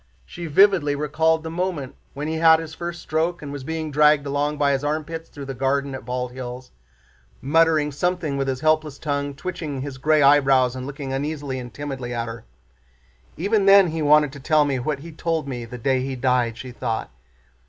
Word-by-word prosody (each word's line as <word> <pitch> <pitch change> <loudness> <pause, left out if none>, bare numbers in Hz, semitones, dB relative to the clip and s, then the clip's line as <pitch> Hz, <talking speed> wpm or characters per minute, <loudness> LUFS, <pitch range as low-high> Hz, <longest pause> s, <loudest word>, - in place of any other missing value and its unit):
She 175 -1 -7
vividly 160 -3 +4
recalled 160 +2 +1
the 160 - -5
moment 170 -6 -3 0.2
when 145 +2 -4
he 160 0 -2
had 160 0 +6
his 160 -1 -7
first 175 +1 -6
stroke 160 +2 -1
and 140 - -6
was 140 -2 -6
being 160 +1 -4
dragged 150 0 +4
along 145 +1 -1
by 145 -1 +2
his 135 0 0
armpits 155 +2 -3
through 140 -1 -9
the 135 - -5
garden 135 +1 -1
at 130 - -7
Bald 125 0 -3
Hills, 125 0 -8 0.7
muttering 155 +1 +3
something 170 0 -1
with 135 0 -1
his 130 -1 -2
helpless 155 -2 +1
tongue, 145 -2 -3
twitching 155 -4 -5
his 135 -1 -6
gray 155 +1 +3
eyebrows 135 -3 +4
and 130 0 -6
looking 140 -1 -5
uneasily 140 -1 -3
and 120 -1 -8
timidly 135 -4 -5
at 115 0 -2
her. 115 - -8 0.9
"Even 200 +3 +1
then 195 -2 +7
he 160 0 -3
wanted 150 -1 +4
to 140 - -9
tell 150 +2 +3
me 135 -3 -1
what 140 +2 -3
he 165 +2 -9
told 160 -1 -2
me 120 -3 -5
the 125 +2 -8
day 130 +2 +1
he 135 0 -3
died," 125 -3 +1
she 130 - -8
thought. 115 - -3
145 Hz, 200 wpm, -23 LUFS, 135-160 Hz, 0.9 s, then